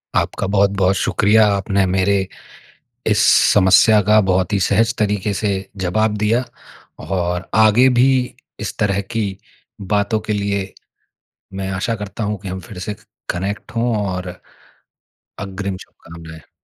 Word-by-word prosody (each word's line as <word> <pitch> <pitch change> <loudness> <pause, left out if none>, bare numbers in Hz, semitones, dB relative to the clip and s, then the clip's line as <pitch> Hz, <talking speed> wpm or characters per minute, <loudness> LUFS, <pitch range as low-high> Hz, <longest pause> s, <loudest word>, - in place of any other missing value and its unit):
आपका 100 - -1
बहुत-बहुत 100 -1 +2
शुक्रिया। 105 +3 +3
आपने 100 0 0
मेरे 95 0 +1 0.8
इस - - +2 0.4
समस्या 105 +2 +5
का 105 +2 +4
बहुत 95 +2 +1
ही 100 - +1
सहज 110 +3 +2
तरीके 105 -1 0
से 105 +1 -1 0.3
जवाब 105 +4 0
दिया 115 +4 +2 0.6
और 90 -1 -2 0.2
आगे 115 +5 +5
भी 130 +2 +5 0.5
इस - - -5
तरह 100 -1 +1
की 115 -2 0 0.7
बातों 105 +2 +1
के 105 - +1
लिए, 100 -1 -2 0.8
मैं 95 0 -4
आशा 100 +5 -2
करता 105 +2 -6
हूँ 105 0 -2
कि 100 - -8
हम 95 +1 -5
फिर 95 - -9
से 100 +4 -4
ख - - -20 0.2
कनेक्ट 95 +4 -4
हों 115 +1 0 0.2
और 90 0 -4 1.1
अग्रिम 95 0 -5
शुभकामनाएँ। 80 -1 -13
100 Hz, 135 wpm, -19 LUFS, 95-105 Hz, 1.1 s, समस्या